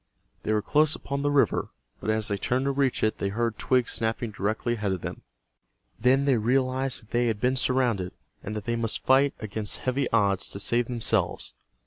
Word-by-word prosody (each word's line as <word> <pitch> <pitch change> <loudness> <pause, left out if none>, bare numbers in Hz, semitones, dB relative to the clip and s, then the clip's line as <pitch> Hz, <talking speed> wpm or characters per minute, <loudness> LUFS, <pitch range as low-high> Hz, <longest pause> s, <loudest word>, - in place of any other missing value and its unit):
They - - -2
were 105 -1 +1
close 155 +1 +3
upon 140 0 -4
the 145 - +1
river, 145 -1 +2 0.3
but - - -4
as 110 0 +2
they 100 - 0
turned 125 +6 0
to 140 - +2
reach 135 -2 0
it 110 - +1
they 100 - 0
heard 115 +2 -1
twigs 125 -2 +2
snapping 115 0 -1
directly 110 +4 -1
ahead 105 -4 -1
of 90 - -4
them. - - -6 0.8
Then 135 +2 +3
they 135 -5 +3
realized 130 +2 +1
that 110 - -23
they 120 0 +2
had 110 -3 -1
been 125 +4 +2
surrounded, 125 -8 +1 0.3
and 105 - -5
that 105 - -4
they 115 0 0
must 115 -1 -2
fight 135 +2 +4
against 110 -1 -3
heavy 130 +1 0
odds 100 -4 +2
to 100 - -7
save 120 +3 +1
themselves. 120 -3 0
120 Hz, 200 wpm, -27 LUFS, 110-130 Hz, 0.8 s, fight